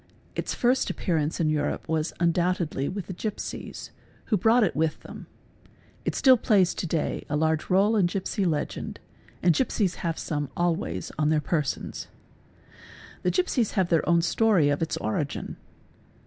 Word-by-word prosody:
Its - - -2
first 250 +2 +2
appearance 160 -3 -1
in 165 - +2
Europe 145 -1 -1
was 160 0 0
undoubtedly 170 -4 +1
with 195 -2 -5
the 185 - -6
gipsies, 210 +3 -5 0.3
who 220 - +1
brought 225 +5 +4
it 170 -9 0
with 155 +1 +1
_ - - -30
them; - - -10 0.8
it - - -1
still 260 -2 +6
plays 200 -6 +3
to 175 - -3
day 160 -1 -1
a 150 - 0
large 160 +1 +1
rdle 205 +4 +3
in 180 - +4
gipsy 190 +2 -2
legend 160 -5 -2 0.4
and 175 -1 +5
gipsies 205 -6 0
have 165 -2 -1
_ - - -20
some 145 -3 -3
always 160 - -1
on 150 0 +3
their 155 -1 +3
persons. 150 -1 -2 1.1
'The - - +1
gipsies 280 - +1
have 190 -4 +1
their 165 -1 +2
own 170 -1 +4
story 180 -4 +3
of 145 +2 0
its 165 - -1
_ - - -8
origin. 135 +7 -2
170 Hz, 170 wpm, -26 LUFS, 155-200 Hz, 1.1 s, still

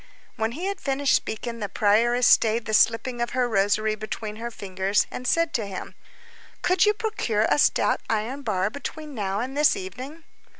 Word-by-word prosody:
When 225 +1 -1
he 335 +8 -5
had 395 -1 -3
finished 275 0 +1
speaking, 230 +2 -3
the 205 -2 -3
prioress 235 +5 +3
stayed 225 0 +4
the 220 - -4
slipping 235 +3 +2
of 240 - 0
her 250 -1 +2
rosary 215 0 +1
between 215 0 -6
her 235 +1 -5
fingers, 195 -2 -1
and 250 - -5
said 335 +2 +2
to 220 -5 -1
him:— 190 -2 -7 0.7
"Could 365 +3 +3
you 420 - +3
procure 400 - -1
a - - +3
stout - - +2
iron 225 +6 -2
bar 205 -5 -1
between 300 +2 -7
now 200 -3 -2
and 260 +3 -5
this 295 0 +4
evening?" 255 - -8
230 Hz, 180 wpm, -25 LUFS, 210-275 Hz, 0.7 s, stayed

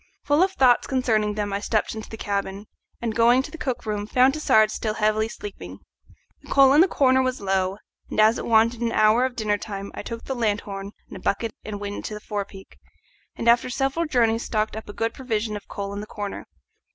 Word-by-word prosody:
Full 290 +3 +3
of 380 +1 +2
thoughts 255 -7 +4
concerning 220 -5 +1
them 205 -1 -2
I 200 - 0
stepped 215 +1 -1
into 220 -1 -8
the 220 - -8
cabin, 200 -1 -3 0.4
and, 225 -2 -1
going 235 +3 +4
to 300 - -9
the 330 - -8
cook 255 -5 -3
room, 210 -1 -3
found 255 +4 +4
Tassard 220 -8 +3
still 215 -1 -3
heavily 215 0 +1
sleeping. 100 - -9 0.6
The - - -17
coal 270 -1 +6
in 300 - +7
the 370 - +6
corner 260 -6 +3
was 255 0 -1
low, 190 -1 0 0.3
and - - -3
as 220 +2 +5
it - - -5
wanted 230 +1 +3
an 235 -1 0
hour 215 +4 +4
of 260 -1 -4
dinner 210 -3 0
time 200 -2 -6
I - - -6
took 230 +2 -7
the 265 - -3
lanthorn 205 -4 -2
and - - -9
a - - -12
bucket 220 +4 -1
and 210 -1 -6
went 205 0 -5
into 215 - -5
the - - -6
forepeak, 200 -2 -7 0.6
and 230 - -4
after 240 +2 +4
several 270 +6 -1
journeys 230 -4 +2
stocked 215 -1 -1
up 220 -1 -8
a - - -7
good 225 +1 -2
provision 220 -4 -2
of 205 - -8
coal 200 0 -5
in 200 - -5
the 210 - -8
corner. 205 -2 -6
220 Hz, 225 wpm, -24 LUFS, 205-245 Hz, 0.6 s, in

